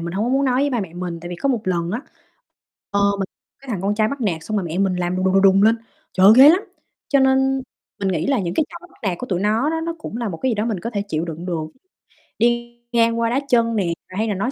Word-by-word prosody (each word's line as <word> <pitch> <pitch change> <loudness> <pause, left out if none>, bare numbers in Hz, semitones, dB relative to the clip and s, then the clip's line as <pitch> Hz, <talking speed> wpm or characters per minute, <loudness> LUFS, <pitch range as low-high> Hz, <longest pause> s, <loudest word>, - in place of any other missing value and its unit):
mình 170 +1 -5
hông 205 +4 -1
có - - -1
muốn 275 +1 +2
nói 255 0 +2
với 285 - +1
ba 240 -4 0
mẹ 175 -4 -7
mình. 175 -2 -5
Tại 175 - -7
vì 175 - -6
có 275 - -1
một 240 -5 +1
lần 175 -2 -1
á, 225 - -2 0.9
ờ, 200 - +1 0.2
mình 195 - 0 0.4
cái 275 - -12
thằng 190 -4 -3
con 205 +1 0
trai 215 0 +2
bắt 280 +1 -5
nạt 170 -7 -1
xong 215 -1 -2
rồi 185 - -1
mẹ 165 +2 -4
mình 195 -2 +1
làm 180 0 -1
đùng, 185 - 0
đùng, 190 +1 +4
đùng 195 +1 +5
lên. 225 +1 +5 0.4
Trời 185 - +4
ơi, 205 - +9
ghê 275 +3 +10
lắm. 355 +4 +5 0.5
Cho 280 - +4
nên 265 0 +3 0.4
mình 195 - -1
nghĩ 165 -3 -1
là 275 -2 +2
những 175 -2 -2
cái 305 - +1
trò 345 +1 -11
bắt - - -24
nạt 185 -4 -1
của 250 - -6
tụi 180 -3 -1
nó 220 +7 +1
đó, 325 0 -2
nó 335 0 -3
cũng 230 - -6
là 235 -4 -2
một 165 - -5
cái 260 -1 0
gì - - 0
đó 210 +2 -1
mình 215 -6 -2
có 230 - -4
thể 205 -4 -2
chịu 160 -2 -2
đựng 165 +1 -6
được. 165 -4 -2 0.7
Đi 240 +1 0
ngang 230 -1 +2
qua 230 0 +1
đá 255 - +1
chân 230 -2 +3
nè, 200 -4 +1 0.2
rồi 185 - -8
hay 220 +1 0
là 210 - 0
nói 200 +7 -2
215 Hz, 300 wpm, -21 LUFS, 185-250 Hz, 0.9 s, ghê